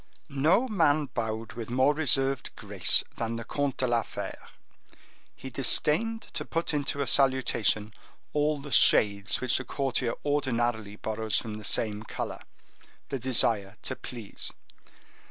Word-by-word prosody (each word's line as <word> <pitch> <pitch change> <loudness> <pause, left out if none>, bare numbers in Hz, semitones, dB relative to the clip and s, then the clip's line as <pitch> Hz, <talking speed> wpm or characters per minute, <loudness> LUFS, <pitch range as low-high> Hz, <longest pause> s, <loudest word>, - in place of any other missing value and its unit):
No 160 - +2
man 155 - +2
bowed 110 -1 -3
with 115 -1 -7
more 130 +4 +3
reserved 135 -3 +1
grace 100 -5 +3
than 115 0 -2
the 115 - -5
Comte 140 +2 -2
de 130 - 0
la 120 -2 +2
Fere. - - -8 0.9
He 130 - -9
disdained 165 - +2
to 155 - -3
put 165 +1 -2
into 145 -1 -2
a - - 0
salutation 130 -6 +2 0.4
all 150 0 +1
the 140 0 -9
shades 100 -2 +4
which 130 -1 +2
a - - -5
courtier 130 -2 -1
ordinarily 120 -7 -1
borrows 110 0 -1
from 110 -2 -2
the - - -11
same 105 +1 0
color—the 135 +4 -9
desire 110 -5 +2
to 130 - -3
please. 115 -6 -7
130 Hz, 135 wpm, -28 LUFS, 110-145 Hz, 0.9 s, shades